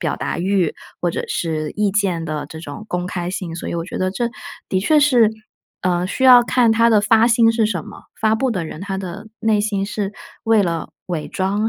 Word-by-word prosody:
表 160 -6 -1
达 - - -3
欲， 185 -2 +1 0.3
或 175 - +1
者 - - -2
是 155 -2 -2
意 210 -1 +1
见 185 -5 0
的 155 -2 -4
这 160 - -9
种 165 +7 -8
公 180 0 -2
开 175 -1 -3
性， 180 -3 -5
所 170 - -5
以 - - -3
我 165 - -3
觉 185 - -6
得 185 0 0
这 235 +5 -1 0.4
的 185 - +1
确 300 +10 +4
是， 250 -7 +5 0.5
呃， 180 -1 +1
需 260 - -1
要 250 -1 +9
看 235 -1 +3
他 230 +1 +4
的 215 -2 +5
发 225 +2 +4
心 230 -1 +4
是 225 -1 +2
什 185 -7 -3
么， - - -12 0.2
发 220 0 +3
布 255 +3 0
的 185 -7 -2
人 155 0 -8
他 195 0 -4
的 185 +3 -7
内 215 -2 +2
心 200 -2 -1
是 205 -1 -3 0.3
为 225 -2 +4
了 170 -3 -2 0.2
伪 170 -4 -4
装 200 +3 0
195 Hz, 240 characters per minute, -20 LUFS, 175-225 Hz, 0.5 s, 要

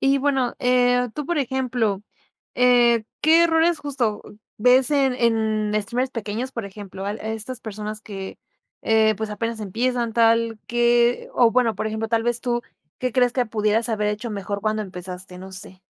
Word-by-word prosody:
Y, 275 0 +3
bueno, 265 -3 0
eh, 250 0 +3
tú, 295 - -4
por 345 -1 0
ejemplo, 245 -6 -1 0.5
eh, 240 -2 +4 0.2
¿qué 325 +2 +5
errores, 325 0 +3
justo, 255 -7 -2 0.4
ves 250 +4 +4
en 275 -3 +2
en 220 -3 +1
streamers 250 +5 -2
pequeños, 230 +3 -4
por 230 -4 -4
ejemplo, 195 -1 -8
al 210 +2 -3
a 220 - -5
estas 225 +3 -5
personas 215 0 -6
que, 195 -2 -8 0.4
eh, 220 -1 +3
pues, 220 0 -4
apenas 230 +1 -3
empiezan 235 +3 -1
tal? 230 -1 +3
¿Qué 240 0 +2
o, 240 -2 +5
bueno, 235 -2 +2
por - - -2
ejemplo, 220 +1 -3
tal 225 0 +1
vez 240 0 0
tú, 240 -1 -1 0.4
¿qué 255 -2 -2
crees 245 -2 +3
que 250 -1 0
pudieras 215 +1 0
haber 210 -2 0
hecho 215 +3 -3
mejor 200 0 -4
cuando 215 +1 -1
empezaste? 180 -1 -9
No 190 +1 -10
sé. 185 0 -9
230 Hz, 175 wpm, -23 LUFS, 215-250 Hz, 0.5 s, qué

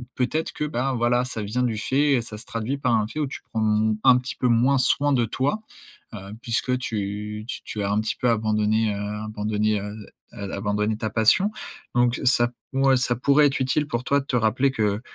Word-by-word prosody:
peut-être 155 +6 -1
que, 150 - -2
ben, 135 -2 -1
voilà, 120 +1 +2
ça 115 -4 -4
vient 115 +5 -2
du 115 -3 -1
fait 135 +4 +2
ça 105 - -6
se 115 - -10
traduit 125 +2 -3
par 130 -4 0
un 105 -1 +1
fait 150 - -6
où 150 - 0
tu 135 - -8
prends, 110 - -2
mmh, 110 0 +2
un 125 -1 +7
petit 125 +1 -5
peu 125 - +1
moins 125 +4 +3
soin 140 +3 +2
de 120 -3 +2
toi. 135 - -1 0.5
Heu, 110 - -6 0.2
puisque 125 +2 0
tu 105 -2 -4
tu - - -5
tu 105 - -4
as 100 - -1
un 105 - +2
petit 110 - -2
peu 125 - +2
abandonné, 110 -1 +1
heu, - - -4 0.3
abandonné, 105 0 -1
heu, 105 +1 -6 0.4
heu, 100 -1 -6
abandonné 105 +1 -1
ta 110 - -2
passion, 115 - +3 0.4
donc 120 0 +2
ça 120 -1 +4 0.2
ouais, 135 0 +4
ça 120 0 +1
pourrait 140 +4 +4
être 140 - 0
utile 140 +3 +1
pour 120 -2 -3
toi 140 +2 +2
de 135 - -11
te - - -4
rappeler 120 +4 +2
que, 105 -4 0
120 Hz, 220 wpm, -24 LUFS, 110-130 Hz, 0.5 s, un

